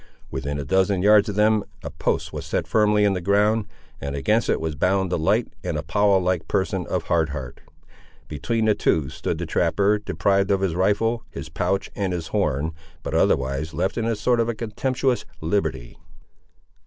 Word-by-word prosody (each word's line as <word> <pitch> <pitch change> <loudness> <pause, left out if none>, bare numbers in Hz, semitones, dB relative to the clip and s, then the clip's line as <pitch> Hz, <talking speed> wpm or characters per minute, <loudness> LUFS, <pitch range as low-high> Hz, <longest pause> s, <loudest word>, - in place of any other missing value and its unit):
Within 70 +1 -3
a 70 - -4
dozen 95 +4 +2
yards 105 +1 +5
of 100 - -4
them 105 0 +3 0.2
a - - -5
post - - -2
was - - -5
set - - -2
firmly 105 -1 +3
in 100 - +3
the 90 - -3
ground, 105 +3 +2 0.3
and 70 0 -4
against 70 - +1
it - - +2
was 80 -1 -2
bound 95 +5 +1
the - - +1
light 80 - +1
and - - -2
Apollo 100 -2 +2
like 90 -3 -1
person 95 -2 -1
of - - -1
Hard 80 -2 +1
Heart. 65 -4 -7 0.7
Between 110 +9 -1
the 110 - +4
two 75 -8 +1
stood 80 - -3
the 85 - -3
trapper, 100 +6 +2
deprived 100 +1 +1
of 100 -1 +2
his 95 -4 0
rifle, 105 +6 +1
his 70 +3 -8
pouch 90 +5 -1
and 95 -3 -1
his 85 -2 -4
horn, 80 -6 0 0.3
but - - -4
otherwise 70 +4 +1
left 95 +4 -1
in 115 - -1
a 115 0 0
sort 120 +3 +1
of 115 -1 0
contemptuous 125 +3 -1 0.2
liberty. 80 -8 -2
95 Hz, 185 wpm, -23 LUFS, 80-105 Hz, 0.7 s, yards